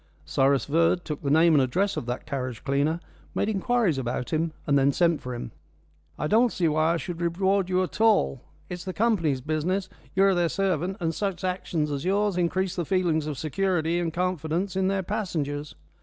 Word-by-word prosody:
Cyrus 135 Hz, -, +2 dB
Verd 165 Hz, +4 st, +2 dB
took 150 Hz, -3 st, -4 dB
the 140 Hz, -, -2 dB
name 160 Hz, +3 st, +5 dB
and 145 Hz, -, +5 dB
address 185 Hz, +11 st, +1 dB
of 120 Hz, -, -4 dB
that 125 Hz, +1 st, -4 dB
carriage 130 Hz, -5 st, -4 dB
cleaner, 145 Hz, +4 st, +1 dB, 0.4 s
made 205 Hz, -, 0 dB
inquiries 215 Hz, -, +1 dB
about 125 Hz, +2 st, -3 dB
him 160 Hz, +1 st, +1 dB
and 140 Hz, -, +2 dB
then 140 Hz, 0 st, +4 dB
sent 170 Hz, +1 st, +2 dB
for 125 Hz, -1 st, -5 dB
him. 120 Hz, -1 st, -6 dB, 0.7 s
"I -, -, -2 dB
don't 225 Hz, +8 st, +4 dB
see 175 Hz, -, +1 dB
why 155 Hz, +2 st, +2 dB
I -, -, 0 dB
should 175 Hz, 0 st, -6 dB
reward 190 Hz, +2 st, +1 dB
you 185 Hz, 0 st, +2 dB
at 185 Hz, -, -5 dB
all. 215 Hz, -, +3 dB, 0.3 s
It's 180 Hz, -1 st, -6 dB
the 185 Hz, -, -5 dB
company's 175 Hz, -, +1 dB
business. 165 Hz, +7 st, -1 dB, 0.3 s
You're 195 Hz, +1 st, +5 dB
their 175 Hz, -2 st, +1 dB
servant, 190 Hz, 0 st, -1 dB
and 165 Hz, -2 st, -1 dB
such 195 Hz, 0 st, -3 dB
actions 175 Hz, -4 st, -1 dB
as 140 Hz, -1 st, -3 dB
yours 200 Hz, +1 st, +1 dB
increase 180 Hz, +1 st, 0 dB
the 175 Hz, -, -1 dB
feelings 165 Hz, -3 st, +1 dB
of 150 Hz, -3 st, -4 dB
security 170 Hz, +2 st, 0 dB
and 170 Hz, -2 st, -1 dB
confidence 180 Hz, +1 st, -1 dB
in 190 Hz, 0 st, +1 dB
their 195 Hz, 0 st, 0 dB
passengers. 155 Hz, -8 st, -3 dB
170 Hz, 195 wpm, -26 LUFS, 150-190 Hz, 0.7 s, name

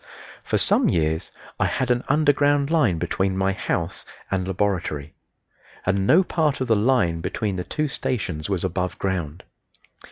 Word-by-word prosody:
For -, -, 0 dB
some -, -, +3 dB
years 80 Hz, 0 st, 0 dB, 0.3 s
I -, -, +3 dB
had 130 Hz, -2 st, -1 dB
an 120 Hz, 0 st, +1 dB
underground 145 Hz, 0 st, +3 dB
line 130 Hz, -, +3 dB
between 95 Hz, +3 st, -1 dB
my 95 Hz, 0 st, +2 dB
house 90 Hz, -1 st, -3 dB, 0.3 s
and 95 Hz, -1 st, -1 dB
laboratory, 90 Hz, -7 st, -2 dB, 0.7 s
and 95 Hz, +1 st, +1 dB
no 180 Hz, +4 st, +6 dB
part 155 Hz, -5 st, 0 dB
of 130 Hz, -, -1 dB
the 110 Hz, -, +4 dB
line 105 Hz, -7 st, +2 dB
between 100 Hz, +3 st, -2 dB
the 90 Hz, -, -3 dB
two 155 Hz, +10 st, -2 dB
stations 100 Hz, -, -3 dB
was 95 Hz, -4 st, -1 dB
above 90 Hz, 0 st, -2 dB
ground. 90 Hz, -4 st, -3 dB
95 Hz, 155 wpm, -23 LUFS, 90-130 Hz, 0.7 s, no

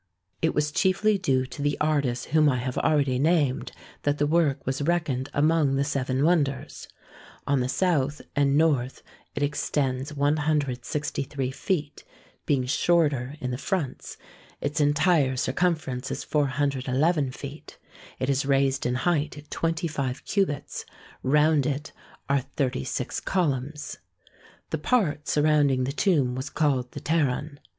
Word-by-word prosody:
It 160 Hz, -, +1 dB
was 150 Hz, 0 st, +1 dB
chiefly 195 Hz, +4 st, +2 dB
due 130 Hz, -8 st, +1 dB
to 135 Hz, -, -8 dB
the 145 Hz, 0 st, 0 dB
artists 140 Hz, -5 st, 0 dB
whom 155 Hz, -2 st, +5 dB
I 130 Hz, -, +1 dB
have 125 Hz, +1 st, -3 dB
already 140 Hz, -5 st, +2 dB
named 145 Hz, -3 st, +1 dB, 0.3 s
that 145 Hz, 0 st, 0 dB
the 145 Hz, -, +2 dB
work 150 Hz, -3 st, +1 dB
was 135 Hz, +2 st, -2 dB
reckoned 145 Hz, -5 st, 0 dB
among 150 Hz, -2 st, +2 dB
the 140 Hz, -, +2 dB
seven 135 Hz, -2 st, -1 dB
wonders. 145 Hz, -6 st, 0 dB, 0.6 s
On 140 Hz, -1 st, +2 dB
the 125 Hz, 0 st, -1 dB
south 150 Hz, -3 st, +1 dB, 0.2 s
and 140 Hz, 0 st, +3 dB
north 140 Hz, -5 st, +1 dB, 0.3 s
it 145 Hz, -, -1 dB
extends 140 Hz, -1 st, -1 dB
163 145 Hz, -2 st, -1 dB
feet, 150 Hz, 0 st, -3 dB, 0.4 s
being 135 Hz, -4 st, +2 dB
shorter 145 Hz, -2 st, +1 dB
in 125 Hz, 0 st, -3 dB
the 125 Hz, -, -4 dB
fronts; 175 Hz, -9 st, -3 dB, 0.4 s
its 145 Hz, +2 st, -1 dB
entire 145 Hz, -2 st, +3 dB
circumference 140 Hz, -3 st, -1 dB
is -, -, -4 dB
411 140 Hz, +1 st, +1 dB
feet; 140 Hz, +3 st, -9 dB, 0.4 s
it 130 Hz, -, -2 dB
is 140 Hz, 0 st, +1 dB
raised 135 Hz, -1 st, +1 dB
in 125 Hz, -, 0 dB
height 150 Hz, 0 st, -1 dB
25 160 Hz, -6 st, -2 dB
cubits; 190 Hz, -9 st, -1 dB, 0.4 s
round 150 Hz, +1 st, +3 dB
it 145 Hz, +1 st, -3 dB, 0.4 s
are 140 Hz, 0 st, +2 dB
thirty 130 Hz, -, -2 dB
six -, -, -3 dB
columns. 150 Hz, -4 st, -2 dB, 0.7 s
The 160 Hz, -, -1 dB
part 155 Hz, -, +1 dB
surrounding 145 Hz, -3 st, +3 dB
the 130 Hz, -, -1 dB
tomb 140 Hz, -5 st, +2 dB
was 130 Hz, +2 st, -4 dB
called 135 Hz, -6 st, 0 dB
the -, -, -7 dB
Pteron. 145 Hz, -2 st, 0 dB
145 Hz, 135 wpm, -26 LUFS, 130-155 Hz, 0.7 s, whom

